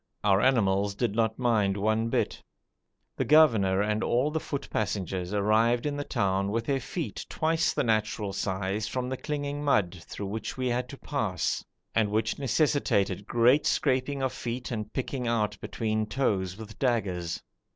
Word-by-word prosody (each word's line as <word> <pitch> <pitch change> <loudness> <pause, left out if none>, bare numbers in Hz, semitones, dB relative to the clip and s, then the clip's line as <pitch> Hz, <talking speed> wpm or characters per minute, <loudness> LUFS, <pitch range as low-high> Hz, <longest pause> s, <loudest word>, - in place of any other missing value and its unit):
Our 100 -1 +4
animals 100 -6 +2
did 120 -1 0
not 110 0 +1
mind 110 -6 +2
one 110 +3 +1
bit. - - -1 0.8
The - - +1
governor 110 -12 +5
and 105 +1 0
all 130 +5 +1
the 160 - 0
foot 140 -2 -5
passengers 95 -3 -2
arrived 110 +4 +2
in 145 -1 -1
the 145 - -2
town 100 -6 0
with 115 +2 -1
their 135 +1 +1
feet 155 +6 -4
twice 160 +1 +1
the - - 0
natural 110 -3 0
size 100 +2 -2
from 125 +2 -3
the 130 - -1
clinging 145 +1 -3
mud, 100 -11 +2
through 100 - -6
which 110 +6 -4
we 130 -1 0
had 125 +1 -1
to 140 - -8
pass, 110 -13 -1 0.3
and 110 -2 +2
which 110 +3 0
necessitated 125 - +1
great 125 +6 +4
scraping 135 0 +1
of 130 - 0
feet 120 +2 -4
and 110 -2 -4
picking 130 -1 -3
out 105 -3 +1
between 110 +1 -1
toes 100 -7 0
with 110 -1 -10
daggers. 95 -10 -1
110 Hz, 165 wpm, -28 LUFS, 100-130 Hz, 0.8 s, governor